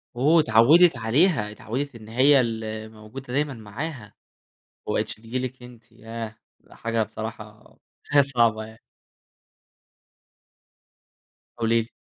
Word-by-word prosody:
أوه! 150 +7 +4
اتعودت 140 +6 +5
عليها 115 - +2
اتعودت 130 +5 -5
إن 110 -1 -12
هي 135 +4 +5
اللي 110 -2 -4
موجودة 110 +4 -10
دايمًا 145 0 0
معاها، 110 +1 -7 0.7
وما - - -2
بقيتش - - -1
تيجي 115 +4 -5
لِك 130 0 -5
أنتِ، 120 -2 -15
ياه! 115 0 -8 0.3
حاجة 115 -1 -2
بصراحة، 105 0 -8 0.3
حاجة 145 -1 +6
صعبة 115 -5 +2
يعني. 110 0 -14 2.8
قولي 115 0 +2
لي. 110 - -8
115 Hz, 115 wpm, -24 LUFS, 110-135 Hz, 2.8 s, حاجة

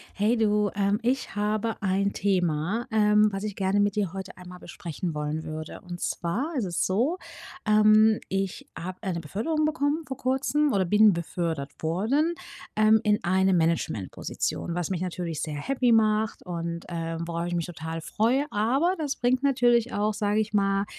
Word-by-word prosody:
Hey, 215 +4 +2
du. 210 -2 +2
Ähm, 200 +1 +1
ich 250 -3 -1
habe 215 +1 -1
ein 200 0 +1
Thema, 185 +2 0
ähm, 210 -1 +4
was 195 +1 -4
ich 210 -2 -3
gerne 195 +1 +1
mit 205 -1 +2
dir 200 -5 -1
heute 190 -1 -7
einmal 180 0 -11
besprechen 170 -1 -6
wollen 150 +1 -3
würde. 155 0 -6
Und 175 -2 -8
zwar 240 - -2
ist 245 - 0
es 175 -2 -1
so, 245 - +1 0.5
ähm, 215 +1 +5
ich 195 -1 -3
habe 185 +2 -6
eine 185 -5 -2
Beförderung 230 - -1
bekommen 305 +1 0
vor 265 - -5
kurzem 275 +3 +1
oder 195 -3 +2
bin 210 +3 +5
befördert 165 -4 -3
worden, 225 - +1 0.4
ähm, 215 +1 +5
in 210 -1 +2
eine 190 +1 +2
Managementposition, 165 - -1
was 175 0 -2
mich 180 -2 -2
natürlich 175 -3 -3
sehr 155 -2 -4
happy 250 - +1
macht 215 -1 +2
und, 170 -1 -4
ähm, 165 -1 -4
worauf 170 0 -3
ich 175 - -3
mich 170 -2 -1
total 160 -1 -6
freue. 235 - +1
Aber 265 - +2
das 290 -3 -2
bringt 250 +1 +1
natürlich 245 -3 +3
auch, 210 +1 0
sage 210 0 +1
ich 215 0 -2
mal, 195 -1 +2
205 Hz, 170 wpm, -26 LUFS, 175-225 Hz, 0.5 s, ähm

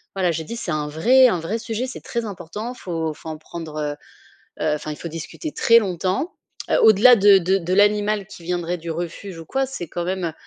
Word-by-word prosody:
voilà 180 -3 +1
j'ai 160 0 -3
dit: 235 - -6
«C'est - - -4
un 150 -1 -1
vrai 250 - +5
un 180 -7 +1
vrai 205 +8 -3
sujet, 230 +2 -3
c'est 255 - -8
très 235 -1 -3
important 210 +5 -6
faut 165 -8 -3
faut 160 - -10
en 155 - -5
prendre 160 -1 -8
heu 145 -1 -2 0.7
heu, 155 -1 +2
enfin, 150 0 -6
il 150 - -7
faut 170 - -6
discuter 165 - -6
très 230 0 +5
longtemps». 190 - -2 0.4
Heu, - - +3
au-delà 220 +3 +7
de 200 -1 +7
de 190 +2 +2
de 180 0 -2
l'animal 205 0 +3
qui 200 -4 -13
viendrait 175 0 -2
du 165 0 -8
refuge 170 +2 -5
ou 165 - -9
quoi, 270 +7 0
c'est 250 -11 -6
quand 175 +2 -4
même, 185 0 -2
heu, 160 - -3
185 Hz, 230 wpm, -22 LUFS, 165-215 Hz, 0.7 s, au-delà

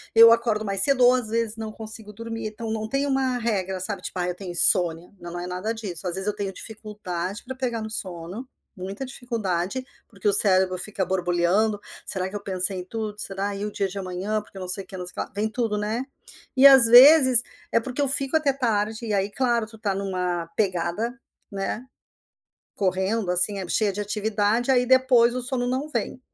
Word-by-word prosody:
eu 230 0 +8
acordo 230 -2 +1
mais 195 -2 +1
cedo 255 +1 +4
ou 245 - +6
às 250 -3 -2
vezes 225 -1 -2
não 220 -1 -6
consigo 220 -1 -7
dormir. 225 +1 -7
Então 220 +1 -7
não 220 0 -4
tem 275 +4 -2
uma 265 -2 -1
regra, 190 -5 -3
sabe? 200 +1 -2
Tipo, 185 - -6
ah, 175 - -1
eu - - -3
tenho 180 -1 -8
insônia. 175 -1 +6
Não 175 0 -8
é 175 - -6
nada 185 +5 -4
disso. 195 -5 -3
Às 175 - -3
vezes 190 - -5
eu 210 - 0
tenho 195 -2 -5
dificuldade 210 -3 -6
para 260 - -6
pegar 245 -3 -4
no 220 - -6
sono, 185 +3 -2 0.3
muita 195 +7 -7
dificuldade, 230 -3 -4 0.2
porque 200 -3 -18
o 205 - +4
cérebro 190 -2 +4
fica 190 0 -2
borbulhando. 185 +4 0 0.3
"Será 190 -1 -3
que 205 - -10
eu - - -11
pensei 185 +1 +5
em 180 - -8
tudo? 215 +1 -6
Será? 200 +1 -1
E 205 - -5
o 210 - -5
dia 195 - -2
de 195 - -9
amanhã? 190 +3 -4
Porque 205 -2 -17
não 185 - -7
sei 195 +2 +2
o - - -35
que, 190 - -11
não 180 - -7
sei 180 - -6
o - - -21
que - - -8
lá", - - -2
não - - -32
se 205 - -3
vem 220 - -1
tudo, 225 -4 -2
né, 215 +5 -3 0.5
eh, 275 - +8
às 265 -3 +8
vezes 255 0 +7 0.3
é 230 - +2
porque 255 +4 -5
eu 280 - +1
fico 275 +2 +2
até 290 -3 0
tarde. 225 -3 -2
E 210 - -2
aí, 195 0 -1
claro, 235 -3 -1
tu 225 - -7
está 205 -2 -2
numa 180 -3 -3
pegada, 200 +5 -2 0.3
né, 200 +5 -5 0.9
correndo 190 +1 -1
assim, 180 +3 +5
é, 185 - -7
cheia 210 +1 +2
de 200 - -5
atividade, 210 +3 -1
aí 250 -1 +3
depois 255 -2 +3
o 255 - -4
sono 250 0 0
não 265 +4 -3
vem. 250 -1 -4
210 Hz, 220 wpm, -23 LUFS, 190-235 Hz, 0.9 s, eu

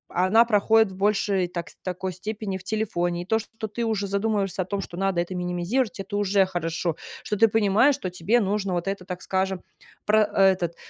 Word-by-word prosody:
а 180 +1 +3
она 225 +4 +6
проходит 220 -1 +3
в 185 - -10
большей 195 -2 +1
так 170 -1 -6
такой 185 0 -3
степени 205 +1 -4
в 190 - -13
телефоне, 175 -5 -1
и - - -15
то, 220 +4 +1
что 225 0 -7
ты 235 +3 -4
уже 220 -3 0
задумываешься 200 -1 -1
о 180 - -2
том, 200 +1 -3
что 175 - -8
надо 195 -1 0
это 175 +2 -5
минимизировать- 180 +5 -1
это 200 +1 -4
уже 200 -1 +3
хорошо, 170 -2 -2 0.3
что - - -2
ты 225 +2 +5
понимаешь, 225 +5 +3
что 185 - -5
тебе 180 +7 +2
нужно 200 -2 -1
вот 175 +2 -2
это, 195 -2 -3
так 180 -1 -6
скажем, 190 -1 -1 0.4
про 215 +1 +4
э, 195 -2 +4
этот 175 -3 -3
195 Hz, 210 wpm, -25 LUFS, 180-215 Hz, 0.4 s, она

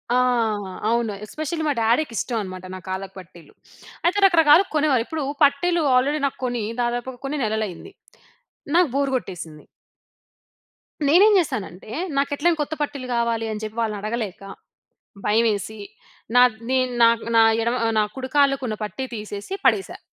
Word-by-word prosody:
ఆ! - - +4 0.7
అవును 230 -2 0
ఎస్పెషల్లీ 310 +7 -4
మా 290 - +2
డాడీకి 235 +4 +1
ఇష్టం 235 -3 -2
అనమాట 185 -1 -8
నా - - -7
కాళ్ళకి 190 0 -5
పట్టీలు. 170 -4 -15 0.5
అయితే 365 +4 +2
రకరకాలుగా 335 0 +5
కొనేవారు. 290 -5 +3
ఇప్పుడు 315 -3 -4 0.2
పట్టీలు 330 +5 +3
ఆల్రెడీ 280 +4 +2
నాకు 275 - -2
కొని 245 -3 -2 0.2
దాదాపుగ 240 +2 -2
కొన్ని 290 +2 -3
నెలలయింది. 215 - -3 0.8
నాకు 350 -3 +4
బోర్ 275 -1 +1
గొట్టేసింది. 165 -9 -6 1.4
నేనేం 385 +9 +6
జేశానంటే, 195 - -3 0.3
నాకు 280 +1 +1
ఎట్లైనా 330 +3 +1
కొత్త 295 - -3
పట్టీలు 280 -3 -3
కావాలి, 230 -1 0
అని 215 0 -5
చెప్పి 215 0 -6
వాళ్ళని 220 -2 -1
అడగలేక, 215 -2 -4 0.8
భయమేసి, 215 -1 +1 0.6
నా 245 - +7 0.3
నె 260 - +2 0.2
నా 230 - +8 0.3
నా 225 - +7 0.2
ఎడమ 235 +2 0
ఆహ్, 225 - +1
నా 215 - +4
కుడుకాళ్ళకున్న 265 -3 +1
పట్టి 210 +6 -5
తీసేసి, 210 - -7
పడేసా. 390 - +1
240 Hz, 140 wpm, -22 LUFS, 215-290 Hz, 1.4 s, నా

